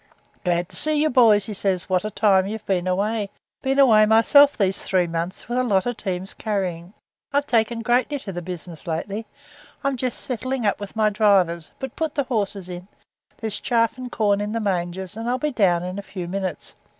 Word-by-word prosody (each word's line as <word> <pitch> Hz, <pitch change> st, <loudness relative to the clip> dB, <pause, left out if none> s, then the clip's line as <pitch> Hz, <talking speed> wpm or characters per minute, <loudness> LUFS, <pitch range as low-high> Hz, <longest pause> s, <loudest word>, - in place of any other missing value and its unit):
'Glad 175 Hz, -1 st, 0 dB
to -, -, -10 dB
see 310 Hz, 0 st, +2 dB
you, 305 Hz, +1 st, +2 dB
boys,' 220 Hz, -5 st, +5 dB
he 215 Hz, -, -5 dB
says; 190 Hz, -2 st, -1 dB
'what 185 Hz, -1 st, +1 dB
a 215 Hz, -, -2 dB
time 195 Hz, -2 st, +3 dB
you've 215 Hz, +1 st, -6 dB
been 185 Hz, -2 st, 0 dB
away! 205 Hz, +3 st, 0 dB, 0.3 s
Been 270 Hz, 0 st, 0 dB
away 220 Hz, -6 st, +6 dB
myself 280 Hz, +6 st, +6 dB
these 195 Hz, -2 st, +1 dB
three 185 Hz, -2 st, +1 dB
months 170 Hz, +2 st, -4 dB
with 240 Hz, +2 st, -1 dB
a -, -, +2 dB
lot 200 Hz, -6 st, +2 dB
of 245 Hz, -1 st, -1 dB
teams 190 Hz, -1 st, -4 dB
carrying. 185 Hz, -4 st, -3 dB, 0.4 s
I've 285 Hz, 0 st, +1 dB
taken 230 Hz, -2 st, +1 dB
greatly 250 Hz, +5 st, +1 dB
to 215 Hz, -7 st, -7 dB
the 175 Hz, -1 st, -5 dB
business 175 Hz, -2 st, -8 dB
lately. 200 Hz, +7 st, -3 dB, 0.6 s
I'm 275 Hz, -1 st, 0 dB
just 250 Hz, 0 st, -3 dB
settling 255 Hz, 0 st, -3 dB
up 205 Hz, -, +1 dB
with 205 Hz, 0 st, -8 dB
my 215 Hz, -1 st, +2 dB
drivers, 190 Hz, -6 st, +2 dB
but 265 Hz, -2 st, -6 dB
put 320 Hz, -2 st, -2 dB
the 285 Hz, -, +1 dB
horses 205 Hz, -7 st, -2 dB
in, 180 Hz, 0 st, -8 dB, 0.5 s
there's 220 Hz, -2 st, -1 dB
chaff 230 Hz, -2 st, +1 dB
and 250 Hz, -1 st, -6 dB
corn 205 Hz, -2 st, +1 dB
in 210 Hz, +1 st, -3 dB
the 230 Hz, -, -1 dB
mangers, 190 Hz, -1 st, -2 dB
and 225 Hz, +2 st, -4 dB
I'll 250 Hz, -, +1 dB
be 300 Hz, +3 st, -1 dB
down 180 Hz, -8 st, +2 dB
in 180 Hz, +2 st, -4 dB
a -, -, -4 dB
few 185 Hz, -3 st, -7 dB
minutes. 185 Hz, -3 st, -4 dB
205 Hz, 210 wpm, -23 LUFS, 185-240 Hz, 0.6 s, away